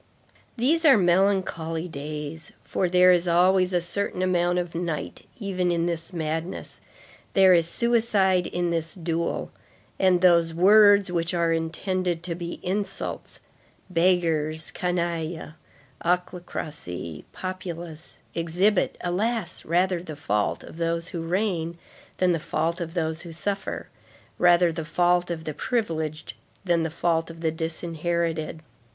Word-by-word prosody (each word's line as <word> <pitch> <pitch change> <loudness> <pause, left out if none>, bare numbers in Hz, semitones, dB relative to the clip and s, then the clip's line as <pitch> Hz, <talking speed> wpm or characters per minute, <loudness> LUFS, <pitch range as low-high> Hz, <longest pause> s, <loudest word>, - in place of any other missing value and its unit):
These 305 +8 +2
are 280 -7 +7
melancholy 175 -3 +1
days; 150 0 -6
for 185 - -1
there 180 +1 +6
is 175 0 +2
always 180 +2 +4
a 180 - +2
certain 180 +1 -2
amount 175 -1 +2
of 175 -1 -2
night 165 -3 -4
even 185 -4 -1
in 170 -1 +1
this 170 0 -3
madness, 165 +1 -4 0.5
there 190 -1 +7
is 170 -2 +3
suicide 205 -4 +2
in 175 -1 -1
this 165 -1 -2
duel, 170 -1 -2 0.5
and 185 -2 +4
those 170 -2 +4
words 200 +1 +6
which 170 0 -1
are 170 -1 +2
intended 170 +1 -2
to 175 -1 -2
be 170 0 -6
insults—beggars, 170 -4 -2
canaille, 170 -3 -2 0.5
ochlocracy, 160 - -3
populace—exhibit, 175 +1 -2
alas! 190 +1 -1
rather 180 +1 +1
the 160 -3 -8
fault 105 -7 -1
of - - -12
those 170 0 -1
who 170 - -4
reign 170 -1 -1 0.4
than 185 -1 +3
the 165 - +1
fault 165 +3 -1
of 165 +1 -5
those 160 -2 -1
who 170 - -9
suffer; 195 +4 -4 0.5
rather 175 -1 +5
the 160 0 -4
fault 175 +2 +2
of 165 -2 -4
the 155 - -4
privileged 160 - -2 0.3
than 170 -2 +2
the 160 - -1
fault 165 0 0
of 165 0 -10
the 160 -1 +1
disinherited. 165 0 -2
170 Hz, 130 wpm, -25 LUFS, 165-185 Hz, 0.5 s, are